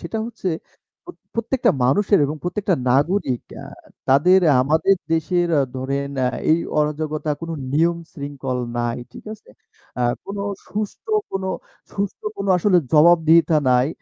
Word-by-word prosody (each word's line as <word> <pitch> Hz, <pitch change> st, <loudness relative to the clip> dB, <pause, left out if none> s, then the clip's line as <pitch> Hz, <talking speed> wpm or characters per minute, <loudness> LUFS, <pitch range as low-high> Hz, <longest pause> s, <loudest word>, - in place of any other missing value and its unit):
সেটা 225 Hz, -, -4 dB
হচ্ছে 215 Hz, -5 st, -5 dB, 0.6 s
প্রত 355 Hz, -, -11 dB, 0.2 s
প্রত্যেকটা 235 Hz, 0 st, +1 dB
মানুষের 200 Hz, -, +3 dB
এবং 150 Hz, +2 st, -4 dB
প্রত্যেকটা 185 Hz, +1 st, 0 dB, 0.2 s
নাগরিক 140 Hz, -1 st, +1 dB, 0.2 s
আ -, -, -9 dB, 0.4 s
তাদের 180 Hz, +8 st, +5 dB, 0.2 s
আমাদের 160 Hz, +8 st, +3 dB, 0.2 s
দেশের 175 Hz, +2 st, +1 dB
আ -, -, +3 dB
ধরেন 140 Hz, +2 st, -2 dB
অ্যা 130 Hz, -1 st, +2 dB, 0.2 s
এই 160 Hz, -, +5 dB, 0.2 s
অরাজকতা, 150 Hz, 0 st, -1 dB
কোনো 165 Hz, 0 st, -5 dB, 0.2 s
নিয়ম-শৃঙ্খল 145 Hz, -5 st, -2 dB, 0.2 s
নাই। 120 Hz, 0 st, -1 dB
ঠিক -, -, -12 dB
আছে? 215 Hz, -, -22 dB, 0.5 s
আ -, -, +2 dB, 0.2 s
কোনো 200 Hz, 0 st, -5 dB, 0.3 s
সুষ্ঠ 210 Hz, -1 st, -5 dB, 0.3 s
কোন 195 Hz, 0 st, -3 dB, 0.5 s
সুষ্ঠ 200 Hz, -, -3 dB, 0.2 s
কোনো 200 Hz, -, -3 dB
আসলে 180 Hz, 0 st, +3 dB
জবাবদিহিতা 165 Hz, 0 st, +5 dB
নাই। 125 Hz, +3 st, +3 dB
165 Hz, 135 wpm, -21 LUFS, 140-195 Hz, 0.6 s, তাদের